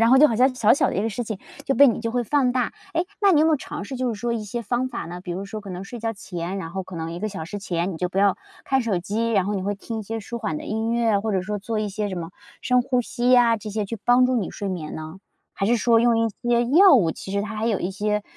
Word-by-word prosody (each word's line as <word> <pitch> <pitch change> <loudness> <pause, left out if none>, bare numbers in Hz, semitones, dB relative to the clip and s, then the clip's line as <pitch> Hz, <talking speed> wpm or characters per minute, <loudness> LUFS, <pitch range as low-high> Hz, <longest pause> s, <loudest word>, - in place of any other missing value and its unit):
然 230 - +5
后 260 - +7
就 300 +3 +7
好 225 - -1
像 255 +2 +4
小 225 -4 +4
小 - - +3
的 - - -3
一 200 - +1
个 225 - 0
事 230 +3 -4
情 215 -1 -4 0.3
就 270 - +2
被 280 -1 +7
你 230 - 0
就 230 0 -3
会 245 - +1
放 255 0 +2
大。 250 -2 0 0.2
哎， 335 +2 +1 0.2
那 400 -2 +5
你 300 - +5
有 - - +5
没 - - +4
有 310 - +4
尝 - - -7
试 260 +6 -6
就 255 0 -1
是 205 - -10
说 240 -1 -1
一 220 -2 -3
些 235 +3 -4
方 245 +3 -1
法 235 - -5
呢？ 175 +1 -7
比 180 -1 -5
如 190 +3 -4
说 215 +2 -6
可 200 - -11
能 180 +1 -5
睡 235 +4 -8
觉 225 0 -2
前， 180 -2 -5
然 165 -4 -6
后 190 0 -4
可 185 - -10
能 165 0 -4
1 170 - -5
个 215 +2 -2
小 190 -6 -6
时 205 +5 -6
前 180 -2 -2
你 - - -6
就 180 +2 -1
不 185 +2 -3
要 200 -1 +4 0.3
看 265 -1 +2
手 215 -5 0
机。 225 +5 -1
然 195 -3 +3
后 205 - -1
你 190 - -2
会 205 +1 -1
听 220 +3 -6
一 - - -4
些 225 +2 -4
舒 235 +3 -6
缓 165 -9 -3
的 - - -6
音 220 +2 -1
乐， 230 -3 +2
或 215 +1 -2
者 185 -1 +1
说 210 +2 -3
做 215 +2 -3
一 210 - -1
些 205 +1 -3
什 190 - -4
么 170 -1 -5 0.3
深 250 -1 +2
呼 250 -1 +1
吸 245 +1 0
呀， 235 -2 +5
这 215 0 -8
些 210 0 -2
去 225 +2 -6
帮 245 +1 +5
助 255 - +1
你 210 -6 -1
睡 200 - -5
眠 165 -5 -5
呢？ 160 +4 -7 0.4
还 195 - -1
是 240 +2 +3
说 230 0 +4
用 235 -1 +3
一 230 - +2
些 240 -1 +2
药 385 -5 +9
物， 175 -10 +4
其 190 - -8
实 200 - 0
它 215 +1 -5
还 220 +2 -1
有 215 -5 +1
一 180 - -2
些 210 +2 -1
215 Hz, 345 characters per minute, -23 LUFS, 195-240 Hz, 0.4 s, 药